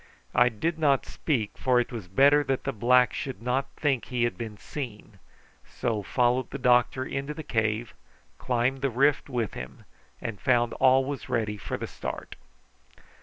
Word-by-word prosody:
I 120 0 +5
did 160 +9 -2
not 140 -4 +3
speak, 115 -10 -2
for 125 -1 +3
it 120 - -1
was 110 -7 -6
better 140 +9 +5
that 135 -1 -1
the 135 - -2
black 125 +3 +4
should 135 -6 -4
not 125 +4 -1
think 135 -5 0
he 125 -2 -1
had 120 - 0
been 110 -3 -6
seen, 110 -6 -8 0.4
so 115 -4 -2
followed 125 +5 +1
the 140 - -5
doctor 125 0 +3
into 140 +3 -4
the 160 - -6
cave, 110 -1 -1 0.5
climbed 125 +2 0
the 140 - +1
rift 140 +4 +2
with 120 -5 -2
him, 65 0 -9 0.3
and 110 -4 -6
found 120 -2 +2
all 135 +2 +4
ready 105 -2 -1
for 100 - -5
the - - -4
start. - - -6
125 Hz, 170 wpm, -27 LUFS, 115-135 Hz, 0.5 s, I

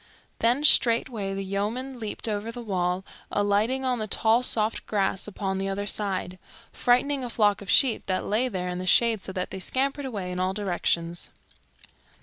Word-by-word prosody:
Then 245 +5 +2
straightway 230 -7 +3
the 195 0 -4
yeomen 230 +7 -3
leaped 220 +1 -5
over 215 +1 -2
the 240 0 -7
wall, 185 -2 -1 0.3
alighting 210 +6 +1
on 250 -2 +1
the 215 - -2
tall 225 +3 +3
soft 220 -3 0
grass 195 -2 0
upon 190 -2 -3
the 195 0 -2
other 200 +1 -2
side, 190 -3 -2 0.3
frightening 260 +3 +2
a 245 - -4
flock 210 -3 +2
of 200 - -9
sheep 255 -5 +3
that 185 -1 -1
lay 225 +5 +1
there 180 -6 -3
in 180 - -4
the 185 - -5
shade 230 0 +4
so 190 - -6
that 185 -1 -3
they 190 - -5
scampered 275 +8 -1
away 200 -8 -4
in 180 - -4
all 185 +1 0
directions. 175 -4 -1
205 Hz, 180 wpm, -26 LUFS, 190-240 Hz, 0.3 s, shade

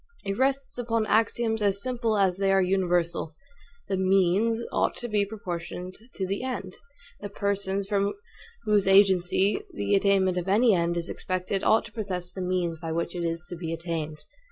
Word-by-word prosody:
It 195 0 -1
rests 270 +1 0
upon 230 -2 0
axioms 225 0 +1
as 200 -1 +1
simple 235 -2 -1
as 190 -2 +2
they 195 0 +2
are 195 - +4
universal; 180 -4 0 0.5
the 195 - -1
MEANS 195 +5 +2
ought - - +1
to 240 - -5
be 210 -3 +1
proportioned 180 -3 -6 0.2
to 190 - -2
the 195 +2 -2
END; 245 -8 -4 0.5
the 205 - -6
persons, 200 -1 -1
from 200 -1 +1 0.5
whose 205 -2 +2
agency 195 0 +4
the 100 0 -2
attainment 195 -2 +3
of 180 - -6
any 220 +4 +4
END 170 -1 +1
is 170 +1 -2
expected, 185 +1 -3
ought 220 - +4
to 225 - -11
possess 185 -5 -4
the 190 - -6
MEANS 180 -3 -1
by 165 -1 -5
which 170 +1 -2
it 175 -1 -3
is 165 +1 -3
to 175 - -5
be 165 -1 -5
attained. 160 -2 -4
195 Hz, 180 wpm, -27 LUFS, 180-210 Hz, 0.5 s, are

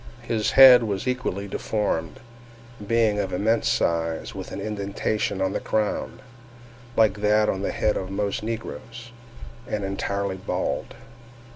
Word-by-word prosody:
His 110 -2 -1
head 130 -2 +10
was 100 +2 -3
equally 125 -6 -2
deformed, 100 -6 -2 0.7
being 110 -2 +2
of - - -2
immense 110 +5 +1
size, 85 -1 -1
with - - -7
an - - -5
indentation 100 -1 -2
on 95 0 0
the - - -1
crown 110 +1 -2 0.8
(like 105 -2 +3
that 105 0 +3
on 95 - -1
the - - -1
head 105 - 0
of 95 - -4
most 100 +1 -2
negroes), 115 +1 -6 0.6
and 105 -1 -3
entirely 100 0 -2
bald. 95 - -3
105 Hz, 135 wpm, -24 LUFS, 100-110 Hz, 0.8 s, head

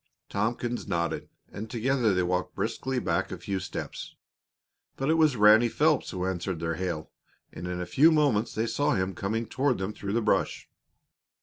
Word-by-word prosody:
Tompkins 120 +3 -2
nodded, 85 -4 -2 0.2
and 110 +2 -7
together 120 0 +1
they 90 -1 +2
walked 90 +1 -1
briskly 130 0 -2
back 90 -9 0
a - - -4
few 95 -1 -3
steps. - - -6 0.8
But 135 +3 +1
it - - +5
was 155 -4 +4
Ranny 105 +3 +6
Phelps 155 +3 +2
who 90 -1 -3
answered 95 -1 -2
their 80 0 -1
hail, 85 -3 -4 0.4
and 90 - -6
in 90 0 -3
a 90 - -2
few 150 - +5
moments 140 -8 +2
they 110 - 0
saw 145 +5 +1
him 95 0 -1
coming 110 +6 -2
toward 130 +2 0
them 95 +2 -3
through 100 -1 -5
the 115 - +2
brush. 95 -6 0
105 Hz, 180 wpm, -28 LUFS, 90-125 Hz, 0.8 s, Ranny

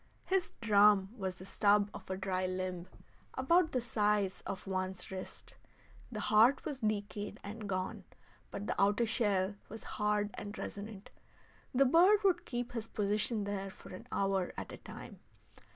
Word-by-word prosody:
His 375 -1 0
drum 205 -3 +5
was 190 -5 -3
the 185 - -11
stub 205 +1 +3
of - - -10
a 190 - -2
dry 185 -1 -1
limb 185 -1 -3 0.5
about 320 +5 +3
the 255 - +1
size 210 -4 +1
of 195 - -5
one's 185 -1 -3
wrist. 190 0 -7 0.5
The 215 -3 -4
heart 220 +6 +5
was 280 -3 -3
decayed 210 -2 -2
and 210 0 -6
gone, 185 -1 -3 0.4
but 205 - -5
the - - -1
outer 205 +4 +4
shell 205 -4 +1 0.2
was 220 +1 -8 0.2
hard 210 0 +2
and 205 0 -7
resonant. 205 0 -7 0.6
The 270 +2 +4
bird 365 +10 +6
would 360 -3 +2
keep 245 0 -3
his 230 -2 -4
position 210 +1 0
there 200 -1 -3
for 190 - -12
an 185 - -9
hour 195 -2 0
at - - -5
a - - -7
time. - - -10
205 Hz, 160 wpm, -34 LUFS, 195-230 Hz, 0.6 s, bird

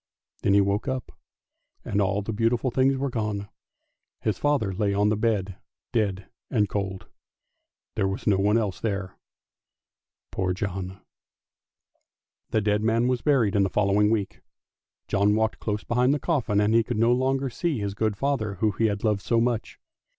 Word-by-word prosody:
Then 100 - +3
he 100 - +6
woke 100 +2 0
up, 130 -1 -3 0.7
and 105 - 0
all 100 +1 0
the 110 - -4
beautiful 115 +4 +1
things 135 +2 +2
were 135 0 -2
gone; 105 -3 -3 0.7
his 110 - -1
father 140 -10 +1
lay 100 +1 0
on 105 +1 +3
the 110 - +2
bed 100 -4 -1 0.4
dead 100 -4 0 0.2
and 105 -5 +2
cold, 95 -2 -3
and - - -29 0.8
there 95 - +1
was 95 +2 -4
no 100 -3 +3
one 105 +3 +3
else 105 -5 -1
there, 100 -4 -3 1.2
poor 95 -1 -1
John! 95 0 -4 1.5
The 110 - +1
dead 105 0 +1
man 115 +2 +2
was 125 -2 0
buried 125 -9 +2
in 100 - +4
the 95 - +2
following 105 +1 +2
week; 105 -4 -1 0.7
John 100 +1 +2
walked 110 0 0
close 105 -1 -3
behind 125 +4 +2
the - - -2
coffin, 130 - 0
and 105 +1 +2
he 115 - +5
could 120 0 -3
no 115 +2 +4
longer 130 +1 +1
see 160 +3 -1
his 100 -2 -3
good 110 -1 -1
father 120 -6 -1
who 105 +3 +1
had 105 -1 0
loved 105 -3 +1
him - - -18
so 115 - +2
much. 120 -1 -1
105 Hz, 175 wpm, -26 LUFS, 100-115 Hz, 1.5 s, he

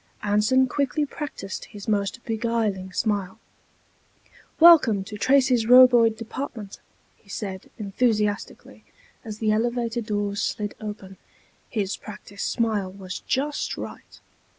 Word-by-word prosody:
Anson 210 +6 +3
quickly 285 +3 -1
practiced 275 -10 -6
his 205 -2 -11
most 205 +3 -1
beguiling 220 -4 -1
smile. 200 0 -1 1.2
"Welcome 290 - +7
to 210 - -9
Tracy's 255 0 +3
Roboid 245 -3 +7
Department," 230 -3 -7 0.4
he 200 - -26
said, 195 -2 -6
enthusiastically, 210 0 -2 0.4
as 215 -3 -7
the 215 -1 +1
elevator 235 +1 0
doors 205 -2 -2
slid 205 -1 -2
open. 205 -3 -8 0.5
His 205 -4 -2
practiced 205 -1 -7
smile 215 -5 -1
was 185 -1 -7
just 285 +3 -2
right. - - -9
215 Hz, 110 wpm, -24 LUFS, 205-245 Hz, 1.2 s, Welcome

